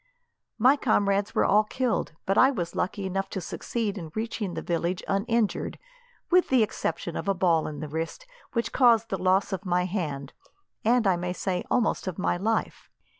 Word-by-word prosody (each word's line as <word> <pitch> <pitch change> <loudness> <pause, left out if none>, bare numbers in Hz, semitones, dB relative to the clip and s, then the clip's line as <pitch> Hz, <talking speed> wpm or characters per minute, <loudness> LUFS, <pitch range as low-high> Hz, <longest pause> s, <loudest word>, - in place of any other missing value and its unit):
My 255 +6 +5
comrades 205 -5 +1
were - - +3
all 210 +2 +5
killed, 235 -3 -1
but 195 - +1
I 260 - +6
was 175 -11 -3
lucky 195 +1 -2
enough 195 +1 -2
to - - -4
succeed 205 +3 -3
in 160 -3 -8
reaching 220 -4 -3
the - - -4
village 170 +1 -1
uninjured, 215 +2 0 0.5
with 365 0 +4
the 255 -4 +5
exception 175 -4 -3
of - - -4
a 195 - +2
ball 170 -3 +2
in 150 0 -6
the 155 - -4
wrist, 165 - -4 0.3
which 235 -1 -1
caused 230 -3 +4
the 195 - -2
loss 190 +2 +2
of 190 0 -3
my 180 -1 +1
hand, 150 -8 -3 0.5
and, 235 +1 +3
I 190 -2 +3
may 180 +1 -3
say, 180 -1 -2
almost 230 -4 +1
of 185 - -3
my 185 - +1
life. 220 +5 -2
195 Hz, 185 wpm, -27 LUFS, 180-225 Hz, 0.5 s, I